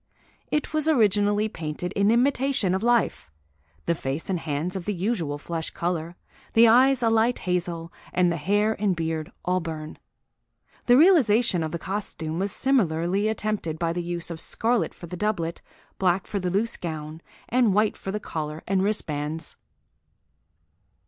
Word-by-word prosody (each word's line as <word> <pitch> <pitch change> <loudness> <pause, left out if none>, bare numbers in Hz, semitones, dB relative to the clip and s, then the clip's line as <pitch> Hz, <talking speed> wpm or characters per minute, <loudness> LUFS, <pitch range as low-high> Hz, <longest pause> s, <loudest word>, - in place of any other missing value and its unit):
It 300 +1 -1
was 310 0 +2
originally 210 -5 +3
painted 165 -2 -5
in 200 +1 +2
imitation 250 -4 +2
of 190 - 0
life, 230 - +1 0.6
the - - +2
face 155 +4 -4
and 180 - 0
hands 160 +4 -2
of 185 -3 -4
the 210 - -1
usual 175 -6 -1
flesh 160 +2 -4
colour, 170 -1 -3 0.4
the 230 +1 +7
eyes 255 +2 +5
a 230 - +4
light 225 +2 +3
hazel, 170 -2 -2 0.2
and 180 -1 +2
the 170 - -1
hair 205 +7 +1
and 200 -3 +2
beard 160 -1 -3
auburn. 165 -4 -3 0.9
The 245 0 +7
realisation 245 - +5
of 160 -1 -2
the 170 - -2
costume 170 -3 -4
was 195 +1 0
similarly 195 -6 +1
attempted 215 -7 -2
by 165 0 -1
the 175 - -2
use 175 0 -3
of 160 -1 -4
scarlet 235 0 0
for - - -10
the 175 +2 -7
doublet, 175 -4 -2 0.4
black 185 0 +2
for 200 - -3
the 180 -1 -1
loose 205 +5 0
gown, 155 -2 -6 0.3
and 245 -3 +3
white 210 +2 +2
for 195 - -6
the 210 - -2
collar 155 -5 -5
and 195 -1 +1
wristbands." 160 -6 -2
185 Hz, 160 wpm, -25 LUFS, 165-220 Hz, 0.9 s, the